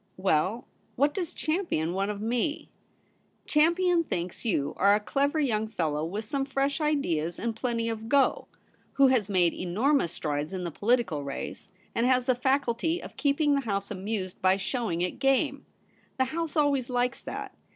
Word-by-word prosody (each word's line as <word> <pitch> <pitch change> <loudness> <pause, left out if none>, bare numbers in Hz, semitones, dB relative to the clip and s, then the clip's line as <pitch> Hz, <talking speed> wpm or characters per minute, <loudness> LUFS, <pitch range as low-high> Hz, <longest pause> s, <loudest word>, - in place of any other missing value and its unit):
' - - -41
Well, 185 +10 +1 0.3
what 285 +3 +2
does 350 -3 -3
Champion 310 - -1
want 195 +2 -1
of 205 -1 -4
me 245 +6 -1 0.3
?' - - -40
* - - -41
Champion 340 +3 +4
thinks 175 - -4
you 145 - 0
are 200 +2 +5
a - - +1
clever 280 +8 0
young 220 -7 +1
fellow, 155 -8 -1
with 200 +7 -4
some 275 +5 -1
fresh 275 +2 -1
ideas 175 - 0
and 230 0 -2
plenty 230 -1 -1
of 225 -1 -2
ISO 225 +1 -9
THE 285 - +3
REBEL - - +7
ROSE. - - -8
gOj - - -13 0.5
who 275 -1 +5
has 230 -6 +2
made 180 -4 +3
enormous 210 - +1
strides 150 +1 -3
in 185 -1 -3
the 170 - -3
poHtical 205 - +1
race, 140 +6 -6 0.2
and 235 +2 +1
has 255 -1 +3
the 255 - +3
faculty 270 +5 0
of - - -10
keeping 290 0 +2
the 280 - +2
House 200 -5 -2
amused 195 -1 -4
by 185 +1 +4
showing 195 -4 -2
it 180 +6 -2
game. 270 +1 +1 0.5
The 260 - +3
House 320 +3 -3
always 280 -5 +2
likes 245 0 0
that. - - -6
235 Hz, 195 wpm, -28 LUFS, 190-280 Hz, 0.5 s, REBEL